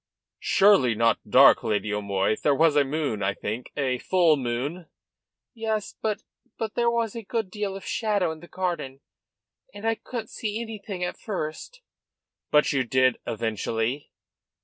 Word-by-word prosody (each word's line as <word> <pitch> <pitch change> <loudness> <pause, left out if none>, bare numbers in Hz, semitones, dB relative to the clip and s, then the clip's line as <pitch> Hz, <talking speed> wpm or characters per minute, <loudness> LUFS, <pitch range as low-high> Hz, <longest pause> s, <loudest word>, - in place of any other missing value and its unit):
"Surely 190 - +4
not 115 +1 +3
dark, - - +7
Lady 105 0 -1
O'Moy? 100 0 0
There 145 +4 +1
was 160 0 +4
a 145 - +5
moon, 140 -6 -2
I 100 +1 0
think 110 +4 -5
a 130 -3 0
full 175 -2 +3
moon?" 140 +7 -3 0.7
"Yes; 220 -3 -2
but 215 -2 -2 0.3
but 220 -2 -3
there 235 0 +2
was 235 -2 0
a 230 - -4
good 220 -2 -3
deal 205 -1 -3
of 195 - -8
shadow 205 -6 0
in 160 - -8
the 175 - -13
garden, 170 -8 -3 0.7
and 205 +2 -8
and - - +1
I 225 - +3
couldn't 225 -1 -7
see 215 -2 -3
anything 210 -5 -5
at 180 - -4
first." 205 - -5 0.7
"But 150 0 +4
you 135 -2 +2
did 130 +1 +2
eventually?" 115 +4 -2
160 Hz, 160 wpm, -26 LUFS, 125-210 Hz, 0.7 s, dark